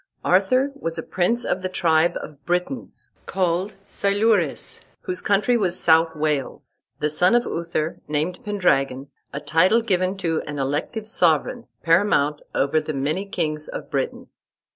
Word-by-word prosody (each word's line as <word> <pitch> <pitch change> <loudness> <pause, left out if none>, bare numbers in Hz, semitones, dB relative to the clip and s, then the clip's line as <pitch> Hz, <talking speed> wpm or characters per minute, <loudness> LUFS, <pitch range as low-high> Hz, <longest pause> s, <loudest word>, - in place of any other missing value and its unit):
Arthur 255 +10 +3
was 165 -12 -5
a - - -3
prince 230 +7 0
of 185 - -1
the 185 - -2
tribe 165 -2 +2
of 145 -2 -11
Britons 180 - -3 0.2
called 185 +2 0
Silures, 205 +2 0 0.2
whose 365 -1 -4
country 205 +5 +2
was 185 -6 0
South 160 0 +4
Wales, 150 -3 -3 0.2
the 150 - +1
son 180 +8 +3
of 240 - +3
Uther, 165 -1 -3
named 155 +4 -2
Pendragon, 140 -9 0 0.2
a 140 - -4
title 185 +10 +3
given 185 -2 0
to 165 -4 -1
an 145 -1 -5
elective 145 - -2
sovereign, 180 - +1 0.2
paramount 165 -4 +3
over 140 +3 +2
the 155 -1 -5
many 155 +9 -1
kings 155 -5 -2
of - - -7
Britain. - - -2
175 Hz, 145 wpm, -23 LUFS, 155-200 Hz, 0.2 s, South